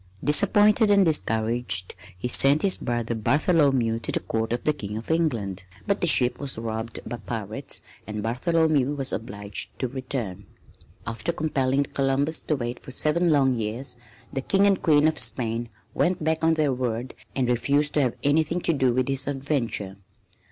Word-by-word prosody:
Disappointed 210 Hz, +8 st, +4 dB
and 200 Hz, -2 st, +5 dB
discouraged 110 Hz, -, +1 dB, 0.2 s
he 110 Hz, -, -3 dB
sent 140 Hz, +4 st, +5 dB
his 195 Hz, -2 st, +4 dB
brother 120 Hz, -1 st, -2 dB
Bartholomew 130 Hz, -1 st, +2 dB
to 115 Hz, -, -3 dB
the -, -, 0 dB
Court 110 Hz, 0 st, -3 dB
of 120 Hz, -, -2 dB
the 150 Hz, -, +2 dB
King 105 Hz, -7 st, -6 dB
of 115 Hz, +7 st, -5 dB
England, 115 Hz, -, -1 dB, 0.2 s
but 200 Hz, 0 st, 0 dB
the 175 Hz, -, +1 dB
ship 125 Hz, -6 st, +3 dB
was 140 Hz, -4 st, -2 dB
robbed 110 Hz, 0 st, -4 dB
by 120 Hz, -, -5 dB
pirates 110 Hz, +4 st, -5 dB, 0.3 s
and 105 Hz, -1 st, -5 dB
Bartholomew 145 Hz, +3 st, +1 dB
was 135 Hz, -2 st, -2 dB
obliged 100 Hz, -2 st, -5 dB
to 130 Hz, -, -2 dB
return. 120 Hz, -7 st, -5 dB, 0.6 s
After 115 Hz, +9 st, -2 dB
compelling 140 Hz, -4 st, 0 dB
Columbus 140 Hz, +3 st, 0 dB
to 155 Hz, -, +2 dB
wait 120 Hz, -2 st, -4 dB
for -, -, -13 dB
seven 155 Hz, +6 st, +1 dB
long 135 Hz, -4 st, +3 dB
years, 120 Hz, +3 st, -4 dB, 0.4 s
the 135 Hz, -, -2 dB
King 195 Hz, +8 st, +2 dB
and 195 Hz, -2 st, +3 dB
Queen 150 Hz, -2 st, +4 dB
of 155 Hz, -2 st, -1 dB
Spain 115 Hz, -1 st, -1 dB, 0.2 s
went 180 Hz, -2 st, 0 dB
back 160 Hz, +1 st, 0 dB
on 160 Hz, 0 st, +4 dB
their 150 Hz, -4 st, +1 dB
word 125 Hz, 0 st, -3 dB, 0.2 s
and 130 Hz, -2 st, 0 dB
refused 140 Hz, +5 st, +1 dB
to 150 Hz, -, +2 dB
have 125 Hz, -4 st, 0 dB
anything 155 Hz, +4 st, +2 dB
to 170 Hz, -, +2 dB
do 130 Hz, -4 st, +1 dB
with 130 Hz, -1 st, +1 dB
his 135 Hz, 0 st, -1 dB
adventure. 130 Hz, -8 st, -2 dB
130 Hz, 175 wpm, -25 LUFS, 115-150 Hz, 0.6 s, and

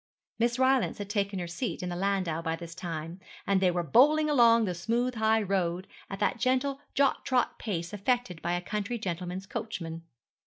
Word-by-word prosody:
Miss 235 Hz, +1 st, +2 dB
Rylance 260 Hz, -1 st, +2 dB
had 205 Hz, 0 st, -5 dB
taken 200 Hz, -2 st, -1 dB
her 180 Hz, -, -3 dB
seat 175 Hz, +1 st, -4 dB
in 180 Hz, -, -2 dB
the 175 Hz, -, -3 dB
landau 185 Hz, -3 st, 0 dB
by 165 Hz, -1 st, -1 dB
this 165 Hz, 0 st, -9 dB
time, 170 Hz, -1 st, -6 dB, 0.3 s
and 195 Hz, -1 st, +2 dB
they 185 Hz, -, +4 dB
were 175 Hz, 0 st, 0 dB
bowling 300 Hz, -, +4 dB
along 230 Hz, -4 st, +5 dB
the 180 Hz, -, -1 dB
smooth 235 Hz, +8 st, -1 dB
high 220 Hz, -1 st, +2 dB
road 185 Hz, -2 st, -1 dB, 0.2 s
at 195 Hz, -, -5 dB
that 205 Hz, +3 st, 0 dB
gentle 260 Hz, +3 st, +1 dB
jog 275 Hz, -1 st, +2 dB
trot 255 Hz, -2 st, 0 dB
pace 170 Hz, -4 st, -3 dB
affected 205 Hz, -4 st, -1 dB
by 175 Hz, -, -1 dB
a 175 Hz, -, -1 dB
country 210 Hz, +5 st, -3 dB
gentleman's 180 Hz, -2 st, -4 dB
coachman. 190 Hz, -7 st, -5 dB
200 Hz, 190 wpm, -29 LUFS, 175-235 Hz, 0.3 s, along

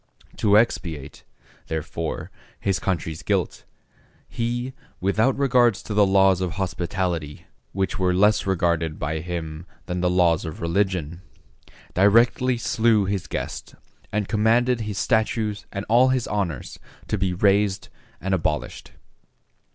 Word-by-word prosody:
To 105 Hz, -1 st, +4 dB
expiate, 80 Hz, -, -1 dB, 0.4 s
therefore, 80 Hz, 0 st, -4 dB, 0.3 s
his 95 Hz, -1 st, 0 dB
country's 80 Hz, -4 st, -2 dB
guilt, -, -, -1 dB, 0.6 s
he, 120 Hz, +2 st, -3 dB, 0.3 s
without 110 Hz, +7 st, +1 dB
regard 125 Hz, -5 st, +4 dB
to 105 Hz, -, -7 dB
the 105 Hz, -1 st, +4 dB
laws 95 Hz, -1 st, +4 dB
of 90 Hz, -3 st, -2 dB
hospitality, 90 Hz, -4 st, -3 dB, 0.3 s
which 95 Hz, +1 st, -2 dB
were 90 Hz, -1 st, +2 dB
less 105 Hz, +3 st, +3 dB
regarded 85 Hz, -4 st, 0 dB
by 80 Hz, +2 st, -2 dB
him 80 Hz, 0 st, -6 dB, 0.2 s
than 90 Hz, 0 st, -3 dB
the 90 Hz, -, +2 dB
laws 90 Hz, -2 st, +3 dB
of 80 Hz, -3 st, -6 dB
religion, 85 Hz, -2 st, -1 dB, 0.7 s
directly 115 Hz, +6 st, +4 dB
slew 115 Hz, -2 st, +2 dB
his 95 Hz, -1 st, -2 dB
guest, -, -, -5 dB, 0.4 s
and 105 Hz, -2 st, -1 dB
commanded 115 Hz, +3 st, +2 dB
his 105 Hz, -2 st, -4 dB
statues 110 Hz, -2 st, 0 dB
and 100 Hz, +1 st, -4 dB
all 120 Hz, +4 st, +5 dB
his 130 Hz, -2 st, +1 dB
honors 90 Hz, -10 st, -3 dB, 0.3 s
to 105 Hz, -, -1 dB
be 95 Hz, -1 st, 0 dB
razed 100 Hz, +1 st, +2 dB, 0.3 s
and 95 Hz, +1 st, -2 dB
abolished. 80 Hz, -4 st, -2 dB
95 Hz, 130 wpm, -23 LUFS, 85-110 Hz, 0.7 s, all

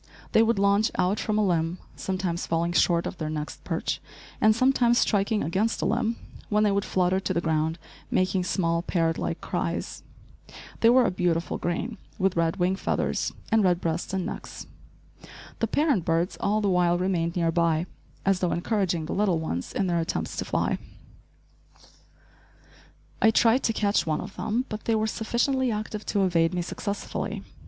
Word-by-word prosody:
They 220 Hz, -, +5 dB
would 225 Hz, -1 st, +3 dB
launch 200 Hz, +2 st, +3 dB
out 185 Hz, +3 st, +1 dB
from 215 Hz, -1 st, -1 dB
a 215 Hz, -, +3 dB
limb, 170 Hz, -1 st, 0 dB, 0.2 s
sometimes 185 Hz, -3 st, -2 dB
falling 170 Hz, +1 st, 0 dB
short 170 Hz, -1 st, +3 dB
of 190 Hz, -, -5 dB
their 155 Hz, -1 st, -2 dB
next 155 Hz, -1 st, -5 dB
perch, -, -, -2 dB, 0.4 s
and 215 Hz, 0 st, +5 dB
sometimes 245 Hz, -1 st, +3 dB
striking 205 Hz, 0 st, +2 dB
against 200 Hz, +7 st, 0 dB
a -, -, +1 dB
limb, 230 Hz, -1 st, +1 dB, 0.3 s
when 210 Hz, 0 st, +3 dB
they 210 Hz, -, +3 dB
would 200 Hz, 0 st, 0 dB
flutter 185 Hz, 0 st, +1 dB
to -, -, -2 dB
the -, -, +3 dB
ground, 160 Hz, 0 st, 0 dB, 0.3 s
making 185 Hz, 0 st, +1 dB
small, 170 Hz, -3 st, 0 dB
parrot 165 Hz, -2 st, 0 dB
like -, -, -3 dB
cries. -, -, -3 dB, 0.8 s
They 230 Hz, -, +5 dB
were 250 Hz, +1 st, +6 dB
a -, -, +1 dB
beautiful 175 Hz, -3 st, -1 dB
green, 195 Hz, +6 st, -3 dB, 0.2 s
with 190 Hz, -1 st, +1 dB
red 165 Hz, -1 st, +1 dB
wing 185 Hz, +1 st, +1 dB
feathers -, -, -1 dB, 0.2 s
and 220 Hz, -1 st, +4 dB
red 180 Hz, -2 st, +3 dB
breasts 170 Hz, +1 st, -2 dB
and 190 Hz, -2 st, -1 dB
necks. -, -, -7 dB, 0.9 s
The 225 Hz, -, +1 dB
parent 285 Hz, -, +2 dB
birds 165 Hz, +3 st, 0 dB
all 210 Hz, +1 st, +1 dB
the 205 Hz, -, +1 dB
while 175 Hz, -2 st, +3 dB
remained 175 Hz, -2 st, 0 dB
near 165 Hz, -2 st, +1 dB
by, 165 Hz, -1 st, +1 dB, 0.4 s
as 195 Hz, -2 st, +3 dB
though 180 Hz, -2 st, 0 dB
encouraging 175 Hz, -3 st, 0 dB
the -, -, -4 dB
little 195 Hz, -4 st, +2 dB
ones 125 Hz, -, -3 dB
in 195 Hz, -, 0 dB
their 175 Hz, -2 st, +1 dB
attempts 165 Hz, -, -2 dB
to -, -, -2 dB
fly. -, -, 0 dB, 2.4 s
I 220 Hz, -, +6 dB
tried 230 Hz, +3 st, +4 dB
to -, -, +3 dB
catch 205 Hz, -4 st, +1 dB
one 155 Hz, -1 st, 0 dB
of 200 Hz, +1 st, -9 dB
them, 235 Hz, +4 st, -1 dB
but 215 Hz, 0 st, -6 dB
they 225 Hz, -, +2 dB
were 215 Hz, 0 st, +1 dB
sufficiently 240 Hz, +4 st, 0 dB
active 215 Hz, -1 st, -4 dB
to 200 Hz, -2 st, +1 dB
evade 170 Hz, -1 st, +2 dB
me 175 Hz, -, -1 dB
successfully. 200 Hz, +3 st, -4 dB
190 Hz, 180 wpm, -26 LUFS, 170-215 Hz, 2.4 s, were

